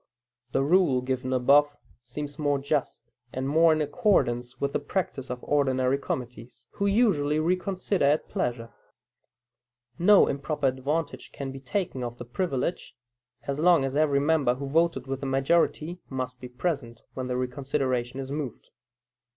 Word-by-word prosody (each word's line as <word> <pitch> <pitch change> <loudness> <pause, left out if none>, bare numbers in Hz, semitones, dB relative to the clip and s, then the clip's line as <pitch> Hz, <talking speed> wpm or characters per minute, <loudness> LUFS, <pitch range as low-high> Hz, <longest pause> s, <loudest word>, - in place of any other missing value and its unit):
The 135 - +1
rule 155 -4 +3
given 130 0 -2
above 145 +3 +4 0.3
seems 145 +5 -7
more 145 -1 +1
just, 135 -4 -2 0.2
and 130 +1 -3
more 160 +3 +5
in 155 0 +2
accordance 125 - +1
with 140 0 -1
the - - +1
practice 145 -4 -3
of 125 0 -5
ordinary 135 -2 +1
committees, 120 -3 -6
who 200 - -1
usually 185 -9 +2
reconsider 185 +1 0
at 145 +2 +2
pleasure. 115 -2 -3 1.3
No 200 +3 +7
improper 145 +1 -2
advantage 140 +5 -2
can 135 -1 -6
be 135 - -8
taken 135 -2 -3
of 120 0 -5
the 120 - -8
privilege, 165 +3 -3 0.5
as 140 +1 -3
long 170 -4 +4
as 135 0 -3
every 145 -2 +3
member 145 -4 +2
who 140 +2 -5
voted 155 -2 +1
with 135 0 -4
the 135 - -4
majority 155 +5 +1
must 130 -1 -4
be 125 - -7
present 125 -4 -3
when 130 -1 -4
the 125 0 -2
reconsideration 130 -1 -2
is 135 0 -5
moved. 145 -5 -5
140 Hz, 150 wpm, -27 LUFS, 130-155 Hz, 1.3 s, No